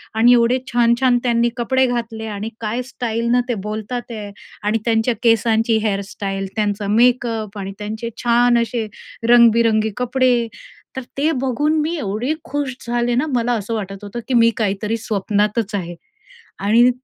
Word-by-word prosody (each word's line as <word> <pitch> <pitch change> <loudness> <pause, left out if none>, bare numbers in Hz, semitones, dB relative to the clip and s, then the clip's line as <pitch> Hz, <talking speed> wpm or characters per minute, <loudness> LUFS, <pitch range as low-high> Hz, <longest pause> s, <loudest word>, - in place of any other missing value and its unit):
आणि 240 +2 +6
एवढे 240 +2 +3
छान-छान 240 +1 +3
त्यांनी 235 -1 +2
कपडे 260 +2 +2
घातले 230 -2 -3
आणि 215 +3 -4
काय 225 +3 -2
स्टाईलनं 240 -1 -1
ते - - +2
बोलतात 235 +3 -5
आहे 210 -2 -6 0.3
आणि 210 +2 +1
त्यांच्या 230 +1 +2
केसांची 225 0 +3
हेअर 200 -2 0
स्टाईल 195 -1 -3
त्यांचा 205 -1 -1
मेकअप 225 -2 +1
आणि 195 0 -5
त्यांचे 220 +3 -4
छान 240 0 +4
असे 230 -1 -2 0.4
रंगबिरंगी 230 -2 +5
कपडे, 250 -1 +2 0.5
तर 265 - -3 0.2
ते 305 +3 +2
बघून 295 +5 +1
मी 325 +3 -1
एवढी 230 +4 -2
खुश 280 -2 -3
झाले 240 0 0
ना, 260 - +1
मला 240 +1 +1
असं 225 0 -3
वाटत 195 -1 -6
होतं 205 +4 -6
की 260 - -2
मी 230 -1 +5
काहीतरी 210 +1 -1
स्वप्नातच 210 0 -1
आहे. 175 -3 -4 0.6
आणि 230 +5 +4
230 Hz, 150 wpm, -19 LUFS, 215-245 Hz, 0.6 s, आणि